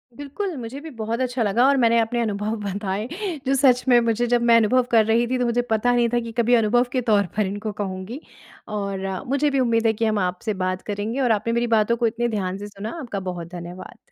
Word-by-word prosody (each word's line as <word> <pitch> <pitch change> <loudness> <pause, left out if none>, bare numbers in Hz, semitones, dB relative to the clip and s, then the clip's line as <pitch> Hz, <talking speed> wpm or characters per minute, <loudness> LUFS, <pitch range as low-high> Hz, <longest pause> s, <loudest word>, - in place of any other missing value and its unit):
बिल्कुल, 290 - -5
मुझे 245 +2 -6
भी 320 - -8
बहुत 225 +2 -2
अच्छा 250 -1 0
लगा 220 +4 +3
और 280 0 +4
मैंने 235 -2 +4
अपने 230 +2 0
अनुभव 210 0 -2
बताए 200 +1 -3 0.4
जो 270 - +3
सच 255 -2 +4
में 245 -2 +6
मुझे 230 +1 0
जब 240 0 +2
मैं 235 0 +5
अनुभव 230 +3 +3
कर 225 -2 +5
रही 225 +2 +2
थी 255 +1 0
तो 250 - +1
मुझे 240 0 +1
पता 220 +3 +2
नहीं 240 -1 +3
था 240 - +3
कि 230 -1 -6
कभी 235 +1 +3
अनुभव 230 +1 +3
के 255 - 0
तौर 205 -2 +4
पर 210 - +2
इनको 205 +3 -4
कहूँगी। 190 +6 -5 0.6
और 195 -1 -3 0.2
मुझे 280 +3 +1
भी 275 -1 0
उम्मीद 230 -2 +1
है 220 - +3
कि 225 +1 -1
हम 215 -1 +1
आपसे 185 +4 -2
बात 185 0 -1
करेंगे 210 +5 -3
और 245 -3 +2
आपने 220 +2 0
मेरी 235 +1 +1
बातों 220 +2 +2
को 235 -1 +2
इतने 235 +2 -1
ध्यान 190 -4 -2
से 205 +1 -7
सुना, 210 +7 -7
आपका 235 -9 -5
बहुत 180 -3 -5
धन्यवाद। 175 +1 -9
230 Hz, 240 wpm, -23 LUFS, 205-245 Hz, 0.6 s, में